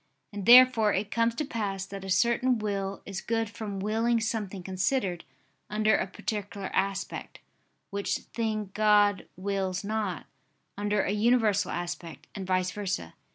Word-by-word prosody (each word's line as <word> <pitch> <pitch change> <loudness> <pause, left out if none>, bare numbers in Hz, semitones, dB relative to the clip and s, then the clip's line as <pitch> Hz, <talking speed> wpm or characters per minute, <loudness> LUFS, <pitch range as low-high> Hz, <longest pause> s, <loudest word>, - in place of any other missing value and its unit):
And 200 -2 -5
therefore 240 -4 +8
it 205 +2 -2
comes 230 0 +1
to 300 - -2
pass 200 -7 -3
that 195 0 -8
a 195 - -7
certain 235 +5 +3
will 200 -2 -3
is 195 -1 -5
good 225 -2 -1
from 210 -3 -5
willing 225 +4 +1
something 210 -4 -3
considered 190 0 -1 0.4
under 215 +1 +3
a - - 0
particular 200 0 -5
aspect, 195 0 -2 0.5
which 200 0 -1 0.2
thing 215 -3 -2
God 205 -1 +3
wills 190 0 -2
not, 210 -4 -2 0.5
under 205 0 0
a - - -1
universal 210 -3 +2
aspect, 175 -1 -5
and 195 -2 -6
vice 185 0 +1
versa. 185 - -4
205 Hz, 145 wpm, -28 LUFS, 195-220 Hz, 0.5 s, therefore